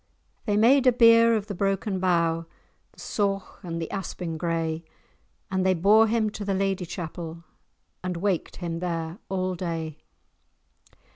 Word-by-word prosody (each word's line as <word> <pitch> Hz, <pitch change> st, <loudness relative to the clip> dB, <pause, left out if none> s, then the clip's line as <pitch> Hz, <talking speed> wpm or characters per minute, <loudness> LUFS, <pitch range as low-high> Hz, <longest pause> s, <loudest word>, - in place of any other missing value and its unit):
They 205 Hz, -2 st, +1 dB
made 255 Hz, +5 st, +5 dB
a -, -, +8 dB
bier 230 Hz, -1 st, +6 dB
of 210 Hz, -2 st, -1 dB
the 210 Hz, -, -5 dB
broken 195 Hz, +1 st, -1 dB
bough, 170 Hz, -2 st, +1 dB, 0.5 s
The -, -, -20 dB
sauch 195 Hz, -2 st, -2 dB
and 170 Hz, -3 st, -5 dB
the 165 Hz, -, -3 dB
aspin 180 Hz, -4 st, -4 dB
gray, 165 Hz, 0 st, -2 dB, 0.7 s
And 190 Hz, -1 st, +1 dB
they 185 Hz, 0 st, +3 dB
bore 210 Hz, +6 st, +5 dB
him 220 Hz, -1 st, +1 dB
to 210 Hz, -, -6 dB
the 195 Hz, -1 st, -1 dB
Lady 195 Hz, -2 st, -1 dB
Chapel, 170 Hz, -1 st, -6 dB, 0.6 s
And 180 Hz, -1 st, -3 dB
waked 190 Hz, -1 st, -1 dB
him 170 Hz, -2 st, -4 dB
there 170 Hz, 0 st, -3 dB
all 185 Hz, -1 st, -1 dB
day. 165 Hz, -3 st, -4 dB
185 Hz, 150 wpm, -26 LUFS, 165-205 Hz, 0.7 s, a